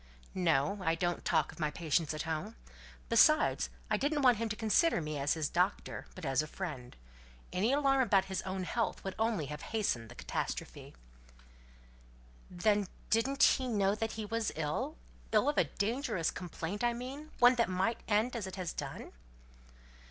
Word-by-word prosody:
"No. 175 +1 +1
I 165 -2 +2
don't 175 +1 -1
talk - - +1
of - - -15
my 155 -2 +1
patients 160 0 0
at 155 0 -3
home. 165 +7 -4 0.5
Besides, 305 +7 +4 0.2
I - - +1
didn't 290 +1 0
want 250 -3 +6
him 230 +1 -2
to 215 - -2
consider 225 - +3
me 155 -2 -4
as 140 +3 +1
his 155 -2 -1
doctor, 180 +5 -1
but 185 - -7
as 135 0 +2
a 155 - -5
friend. 150 -8 -6 0.6
Any 205 +7 +2
alarm 275 -1 +3
about 200 -6 +3
his 190 -1 -3
own 190 0 -4
health 230 +5 -2
would 195 - -3
only 220 -8 +1
have 150 +2 -6
hastened 160 - -1
the - - -11
catastrophe." - - -5 1.5
"Then 205 +2 +1 0.2
didn't 270 +5 +2
he 260 -1 +4
know 200 -4 +2
that 220 +1 -2
he 220 -1 -4
was 225 +1 -1
ill 160 - -2 0.3
ill 215 +4 +3
of 295 - +2
a - - +4
dangerous 215 - -1
complaint, 180 +4 -5
I 240 0 +3
mean: 265 +6 -7
one 245 +1 +7
that 235 -4 +2
might 190 +5 0
end 220 +4 +2
as 215 -5 -3
it 190 - -7
has 185 -4 -4
done?" - - -6
205 Hz, 175 wpm, -33 LUFS, 165-235 Hz, 1.5 s, one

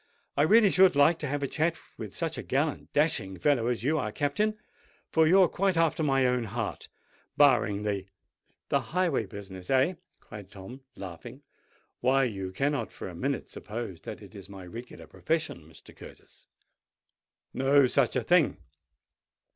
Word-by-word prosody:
"I - - +2
really 205 +5 +5
should 185 -4 +5
like 155 +4 +4
to 150 - -3
have 145 +1 -2
a - - 0
chat 160 +4 0 0.2
with 105 -3 -7
such 165 +10 -3
a - - -3
gallant, 145 +4 -2
dashing 125 - 0
fellow 120 - +2
as 120 -2 -1
you 155 +4 +1
are, 110 -6 -2
Captain; 210 - 0 0.5
for 160 -1 +4
you're 185 +2 +6
quite 190 -1 0
after 165 -1 +2
my 135 -3 +2
own 125 -1 +1
heart—barring 110 0 -1
the——" 100 -2 -2 0.6
"The 140 - +3
highway 160 - -1
business—eh?" 100 - -1 0.3
cried 105 -3 -11
Tom, 110 +8 -11
laughing. 90 -4 -9 0.6
"Why, 135 +2 +3
you 95 -6 -3
cannot 135 +3 -1
for - - -7
a 90 - -10
minute 135 +6 -2
suppose 105 -5 -7
that - - -8
it - - -14
is 100 -1 -11
my 95 -2 -10
regular 115 +7 -10
profession, 155 - -3
Mr. 80 - -17
Curtis? - - -15 1.1
No 135 +1 +4
such 125 - +2
a - - 0
thing! - - +3
130 Hz, 155 wpm, -28 LUFS, 105-155 Hz, 1.1 s, you're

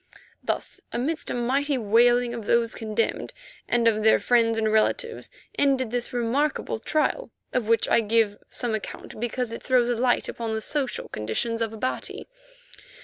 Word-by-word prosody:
Thus - - -3
amidst 300 +7 -2
a - - -2
mighty 270 +4 +1
wailing 240 +2 +3
of 230 -3 -6
those 235 -1 +2
concerned 220 0 -2 0.3
and 235 -1 +2
of 215 -1 +3
their 220 +1 +5
friends 230 -2 +2
and 220 -1 +1
relatives 450 - 0 0.3
ended 265 -4 +2
this 245 0 -2
remarkable 245 +2 0
trial, 310 - 0 0.2
of 245 -4 0
which 230 0 +3
I - - +4
give 220 -1 +1
some 240 -3 -3
account 215 0 -6
because 240 +1 -2
it 230 - -6
throws 250 -2 +2
light 245 0 +2
upon 225 -1 -3
the 220 - -2
social 280 +1 -2
conditions 170 - -2
of 225 -1 0
Abati. 225 +4 -3
235 Hz, 155 wpm, -25 LUFS, 225-255 Hz, 0.3 s, their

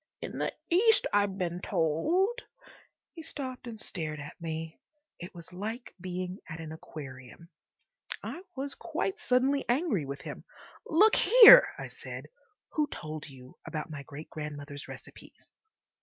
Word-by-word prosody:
In - - -6
the - - 0 0.2
East, 435 +6 +5
I've 205 -1 +2
been 175 -2 -2
told—" 270 - +1 0.7
He 330 - -8
stopped 260 -5 -6
and 225 -2 -7
stared 155 -7 -4
at 145 +1 -8
me. 160 0 -5 0.4
It 175 +1 -9
was 170 +1 -11
like 220 +6 -5
being 185 +1 -4
at 160 0 -6
an 160 -1 -7
aquarium. 145 0 -10 0.7
I 350 - -5
was 275 +1 -3
quite 395 +2 -3
suddenly 265 +2 +2
angry 240 - +1
with 140 +1 -6
him. - - -7 0.4
"Look 420 +7 +5
here," - - +10
I - - -6
said, - - -8 0.4
"who 300 -1 +1
told 155 - -7
you 130 -2 -14
about 155 0 -4
my 150 -2 -6
great 140 +3 -10
grandmother's 145 -2 -7
recipes?" - - -12
180 Hz, 140 wpm, -30 LUFS, -, 0.7 s, here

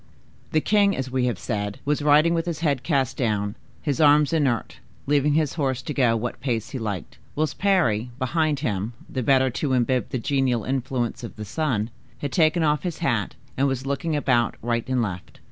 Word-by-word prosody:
The 155 - +2
king, 200 +1 +3
as 130 -1 -3
we 130 -1 +1
have 120 -6 -1
said, 105 -1 -3
was 145 +1 +1
riding 150 +3 +5
with 165 0 -1
his 170 -2 -3
head 145 -6 +1
cast 135 -3 0
down, 105 -4 0 0.3
his 145 0 0
arms 150 +1 +5
inert, 135 -8 0 0.3
leaving 145 +1 +2
his 155 -3 +1
horse 130 -2 0
to 150 - -4
go 120 -5 +3
what 120 +2 -4
pace 120 -5 -2
he 135 - -4
liked, 90 - -5 0.2
whilst 155 +1 -1
Parry, 160 - +2
behind 150 +2 0
him, 105 -4 -2
the 130 - -3
better 130 +1 +3
to 135 +2 -1
imbibe 125 0 +1
the - - -2
genial 130 -2 0
influence 130 -2 -2
of 115 - -7
the 105 - -6
sun, 115 -3 -1 0.3
had 145 - -4
taken 160 +2 +3
off 150 -2 +2
his 175 -2 -3
hat, 110 -8 0 0.2
and 135 +1 +2
was 135 -1 -2
looking 150 +4 -1
about 125 -6 +2
right 120 +1 -1
and 125 -2 +2
left. 95 -4 -6
130 Hz, 195 wpm, -24 LUFS, 120-150 Hz, 0.3 s, riding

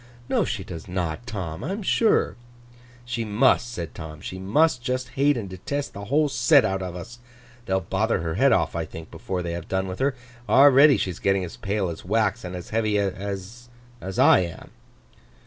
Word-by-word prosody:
'No, - - +2
she 95 - -3
does 85 -3 -9
not, 90 +4 -3
Tom, 90 -8 -5
I - - -3
am 205 +1 -5
sure!' 220 +3 +2 0.7
'She 120 -1 -3
must,' 120 +3 +2
said 85 -9 -6
Tom. 80 -2 -8
'She 95 +2 -7
must 125 +9 +2
just 130 +1 -2
hate 140 0 +2
and 105 -4 -4
detest 140 +11 -4
the 100 0 -7
whole 150 +7 +2
set 140 0 +4
out 95 0 -1
of 90 -1 -5
us. 105 +7 -9 0.5
They'll 95 0 +1
bother 95 +3 0
her 80 -1 -2
head 135 +10 +3
off, - - +1
I 85 - -1
think, 80 +1 -10
before 90 -1 -4
they 85 - -3
have 85 0 -6
done 95 0 -1
with 95 0 -6
her. 135 0 +1 0.3
Already 140 +3 +7
she's 90 -3 -3
getting 95 -1 +1
as 85 - -9
pale 100 -1 -2
as 85 - -6
wax, 110 +3 0
and 90 0 -6
as 90 - -8
heavy 110 -1 +1
as—I 100 +3 0
am. 85 -2 -5
100 Hz, 190 wpm, -24 LUFS, 90-120 Hz, 0.7 s, Already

